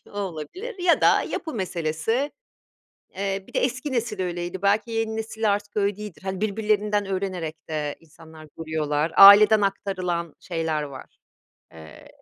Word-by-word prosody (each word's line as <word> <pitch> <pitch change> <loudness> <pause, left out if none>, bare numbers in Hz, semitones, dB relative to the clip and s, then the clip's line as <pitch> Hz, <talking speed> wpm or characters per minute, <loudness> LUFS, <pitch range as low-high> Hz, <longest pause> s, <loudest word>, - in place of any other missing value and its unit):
o 205 - -8
olabilir 205 - -6
ya 355 -1 +3
da - - +4
yapı 320 - -5
meselesi. 190 - -2 0.8
Eee, 195 0 -2
bir - - -17
de - - +1
eski 260 +3 -2
nesil 230 -5 -2
öyleydi, 175 +1 -4
belki 205 +3 +1
yeni 225 -1 -1
nesil 220 -1 -1
artık 205 +1 -5
öyle 200 -1 +1
değildir. 210 -5 -9
Hani, 190 0 -4
birbirlerinden 210 -1 0
öğrenerek 185 -5 -4
de 150 -2 -3
insanlar 160 -1 -15
duruyorlar. 155 -1 -1
Aileden 205 +2 +9
aktarılan 185 -4 -2
şeyler 160 -3 -2
var, 135 -3 -10 0.6
eee, 80 -1 -13
195 Hz, 140 wpm, -24 LUFS, 165-215 Hz, 0.8 s, Aileden